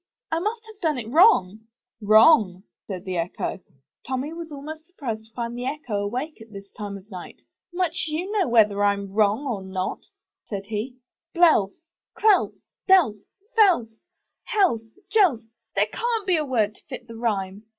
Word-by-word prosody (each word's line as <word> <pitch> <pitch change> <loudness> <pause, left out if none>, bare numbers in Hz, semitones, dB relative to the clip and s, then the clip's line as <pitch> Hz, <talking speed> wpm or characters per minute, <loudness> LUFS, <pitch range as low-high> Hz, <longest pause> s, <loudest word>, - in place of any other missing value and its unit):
I 325 - +1
must 440 +5 -3
have 435 -2 -15
done 315 -5 +1
it 240 - -4
wrong/' 220 - +4 0.3
'Wrong!" 215 - +5 0.2
said 185 -2 -6
the 185 -2 -3
Echo. 170 +3 -3 0.4
Tommy 265 +4 -3
was 335 -1 -8
almost 310 +3 -8
surprised 235 -11 -5
to 225 - -23
find 235 -1 -4
the 245 +1 -4
echo 250 -9 -3
awake 250 +7 -4
at 225 0 -13
this 200 -1 -10
time 205 -2 -6
of 195 +3 -17
night. 180 -2 -10 0.3
*'Much 350 -1 -1
you 330 +6 -3
know 415 -6 +1
whether 220 -3 +5
Fm 200 -1 +1
wrong 215 +6 +2
or 230 -8 -2
not," 190 -1 -4 0.4
said 200 -2 -6
he. 220 +4 -4 0.4
"Belf! 315 - +4 0.5
Celf! 420 -3 +4 0.3
Delf! 360 - +5 0.4
Felf! 370 - +4 0.6
Helf! 380 - +3 0.3
Jelf! 370 - +4 0.3
There - - +3
can't 465 -3 -2
be 365 -3 +3
a 305 - -1
word 220 -6 +1
to - - -23
fit 240 - -8
the 230 - -10
rhyme. 205 -3 -2
240 Hz, 165 wpm, -24 LUFS, 205-330 Hz, 0.6 s, Wrong